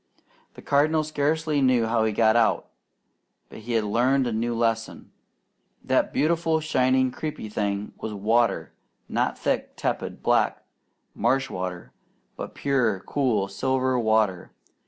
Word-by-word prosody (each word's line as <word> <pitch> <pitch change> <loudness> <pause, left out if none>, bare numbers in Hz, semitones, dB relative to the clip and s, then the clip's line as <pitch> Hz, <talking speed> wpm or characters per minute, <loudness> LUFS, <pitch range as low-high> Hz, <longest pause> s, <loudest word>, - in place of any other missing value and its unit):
The - - -12
Cardinal 155 +2 +2
scarcely 155 0 0
knew 130 -3 +3
how 110 0 +1
he 110 - +1
got 110 +1 +3
out, 115 -2 +2 0.8
but - - -11
he 115 +2 -5
had 115 -1 +2
learned 125 +6 +2
a 120 - -2
new 115 +2 -1
lesson. 115 -1 -2 0.7
That - - +1
beautiful, 165 +1 +1
shining, 130 -4 +2
creeping 140 -6 -6
thing 100 -1 -2
was 110 - -5
water; 110 +4 +1 0.3
not - - -1
thick, - - -2
tepid, - - -3
black - - +1 0.5
marsh 135 0 0
water, 90 -1 -5 0.4
but - - -7
pure, 120 -9 0
cool, 115 -8 0
silver 130 +5 0
water. 110 -5 +1
120 Hz, 135 wpm, -25 LUFS, 110-140 Hz, 0.8 s, knew